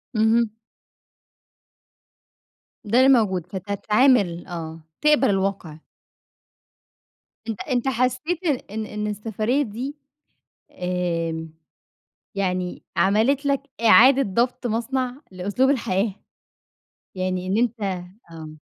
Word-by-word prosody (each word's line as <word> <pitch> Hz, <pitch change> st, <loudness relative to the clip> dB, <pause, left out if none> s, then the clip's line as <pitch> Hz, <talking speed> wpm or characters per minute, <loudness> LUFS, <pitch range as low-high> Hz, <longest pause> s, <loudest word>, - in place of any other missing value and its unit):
اهم. 220 Hz, +1 st, +3 dB, 2.3 s
ده 225 Hz, +4 st, +1 dB
اللي 260 Hz, +1 st, +6 dB
موجود 190 Hz, -9 st, +2 dB
فتتعامل، 200 Hz, 0 st, +1 dB
آه، 165 Hz, -2 st, -6 dB, 0.2 s
تقبَل 300 Hz, -5 st, +4 dB
الواقِع. 190 Hz, -5 st, -1 dB, 1.7 s
أنت 220 Hz, -3 st, -4 dB
أنت 255 Hz, -2 st, -1 dB
حسّيت 265 Hz, +8 st, -1 dB, 0.3 s
إن 220 Hz, 0 st, -3 dB
إن 210 Hz, 0 st, -4 dB
السفرية 220 Hz, +5 st, -1 dB
دي 255 Hz, +6 st, -5 dB, 0.8 s
آمم، 165 Hz, -3 st, -3 dB, 0.8 s
يعني 185 Hz, -2 st, -2 dB
عملِت 235 Hz, +9 st, +2 dB
لك 275 Hz, -1 st, +1 dB, 0.2 s
إعادة 260 Hz, +5 st, +7 dB
ضبط 245 Hz, +5 st, -1 dB
مصنع 250 Hz, +3 st, -2 dB
لأسلوب 205 Hz, +9 st, 0 dB
الحياة؟ 200 Hz, -6 st, 0 dB, 1.0 s
يعني 185 Hz, 0 st, -2 dB
إن 195 Hz, +4 st, 0 dB
أنت 235 Hz, -1 st, 0 dB, 0.5 s
آه. 155 Hz, -1 st, -10 dB
215 Hz, 90 wpm, -23 LUFS, 185-255 Hz, 2.3 s, إعادة